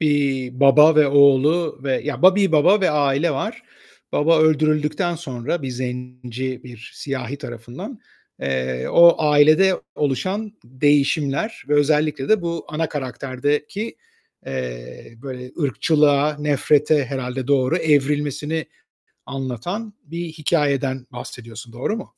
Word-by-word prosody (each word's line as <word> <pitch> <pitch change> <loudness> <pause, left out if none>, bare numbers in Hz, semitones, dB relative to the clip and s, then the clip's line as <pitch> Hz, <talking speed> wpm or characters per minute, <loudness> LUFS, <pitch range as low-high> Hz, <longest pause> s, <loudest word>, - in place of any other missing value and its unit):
eee, 140 -4 0
baba 150 +4 +5
ve 150 -2 +6
oğlu 140 +3 +3
ve 135 -2 -1
ya, 150 +3 -4
ba 185 +1 +7
bir 195 -5 +2
baba 175 +7 +4
ve 185 - +2
aile 145 +2 +1
var. 135 - -4 0.5
Baba 160 +2 +3
öldürüldükten 155 +3 +1
sonra 145 0 -4
bir 130 - -4
zenci, 125 0 -5
bir 120 -2 -12
siyahi 135 -1 -5
tarafından, 130 - -9 0.4
eee, 65 -1 -2
o 170 0 +7
ailede 155 +5 +4
oluşan 185 - -2
değişimler 145 - 0
ve 150 - +2
özellikle 150 -1 +1
de 215 -4 +3
bu 170 -2 -4
ana 155 +1 -2
karakterdeki, 145 - -3 0.5
eee, 65 - -7
böyle 125 -2 -8
ırkçılığa, 150 +1 +2
nefrete 150 0 +2
herhâlde 130 -1 -5
doğru 140 +2 +2
evrilmesini 150 0 0 0.6
anlatan 135 - -5
bir 170 +3 -6
hikâyeden 140 -5 -1
bahsediyorsun. 115 -1 -10
Doğru 130 - -3
mu? 220 - -7
145 Hz, 120 wpm, -21 LUFS, 130-155 Hz, 0.6 s, ba